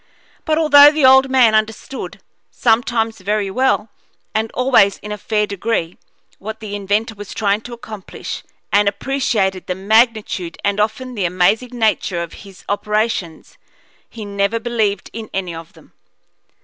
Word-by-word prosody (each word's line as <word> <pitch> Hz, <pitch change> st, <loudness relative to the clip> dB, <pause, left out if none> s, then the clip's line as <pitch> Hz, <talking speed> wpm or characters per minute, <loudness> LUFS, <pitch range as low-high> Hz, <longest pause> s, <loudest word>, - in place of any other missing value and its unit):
But 310 Hz, -1 st, +1 dB
although 290 Hz, -2 st, +8 dB
the 300 Hz, -3 st, +2 dB
old 265 Hz, +1 st, +6 dB
man 250 Hz, -4 st, +4 dB
understood, 215 Hz, +4 st, -2 dB, 0.3 s
sometimes 225 Hz, -1 st, 0 dB
very 200 Hz, +1 st, -1 dB
well, 240 Hz, -2 st, +1 dB, 0.4 s
and 220 Hz, +1 st, -1 dB
always 250 Hz, -6 st, +3 dB
in 210 Hz, -, -9 dB
a -, -, -2 dB
fair 210 Hz, 0 st, 0 dB
degree, 200 Hz, -4 st, -3 dB, 0.4 s
what 220 Hz, +2 st, -7 dB
the 215 Hz, -2 st, -7 dB
inventor 205 Hz, +3 st, -1 dB
was 205 Hz, -2 st, -9 dB
trying 205 Hz, -1 st, +1 dB
to 240 Hz, -, -9 dB
accomplish, 220 Hz, -4 st, -8 dB, 0.3 s
and 205 Hz, 0 st, +4 dB
appreciated 200 Hz, -6 st, -1 dB
the 180 Hz, -, -2 dB
magnitude 215 Hz, -3 st, +1 dB
and 200 Hz, 0 st, 0 dB
often 225 Hz, +4 st, -1 dB
the 200 Hz, -6 st, -2 dB
amazing 195 Hz, +8 st, +1 dB
nature 210 Hz, -6 st, 0 dB
of 170 Hz, -, -9 dB, 0.2 s
his 190 Hz, -, -17 dB
operations, 210 Hz, -5 st, -2 dB, 0.5 s
he 220 Hz, -3 st, -8 dB
never 200 Hz, +2 st, -1 dB
believed 220 Hz, -4 st, -1 dB
in 225 Hz, -1 st, -7 dB
any 185 Hz, -3 st, -3 dB
of 165 Hz, 0 st, -10 dB
them. -, -, -20 dB
215 Hz, 150 wpm, -18 LUFS, 200-235 Hz, 0.5 s, although